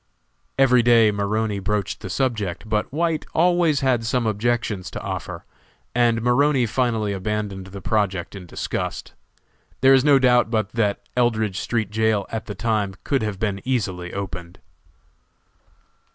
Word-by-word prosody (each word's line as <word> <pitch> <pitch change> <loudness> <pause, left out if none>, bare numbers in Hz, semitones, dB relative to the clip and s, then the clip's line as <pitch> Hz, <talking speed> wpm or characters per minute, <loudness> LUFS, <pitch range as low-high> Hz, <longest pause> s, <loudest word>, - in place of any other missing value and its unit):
Every 130 -2 +5
day 115 -2 +5
Maroney 105 +1 -1
broached 100 0 -2
the 100 - -7
subject, 110 -4 -2
but 105 -1 -1
White 165 +1 0
always 170 -3 +3
had 130 -4 +2
some 120 +1 0
objections 110 -2 -1
to - - -6
offer, - - -6 0.5
and 115 -2 +2
Maroney 130 +1 +3
finally 115 -3 0
abandoned 100 -1 -3
the 95 0 -9
project 100 -5 -1
in 95 -2 -9
disgust. - - -4 0.7
There 135 +1 +7
is 130 -1 +5
no 145 -1 +6
doubt 125 -3 +4
but 110 -3 0
that 110 -3 -1
Eldridge 110 -5 +1
street 110 -4 -2
jail 110 -2 +1
at 110 - -4
the 105 - -5
time 105 -2 -1
could 140 -2 0
have 105 -3 -3
been 100 -1 -2
easily 95 -9 -2
opened. 90 -3 -6
110 Hz, 145 wpm, -22 LUFS, 100-125 Hz, 0.7 s, There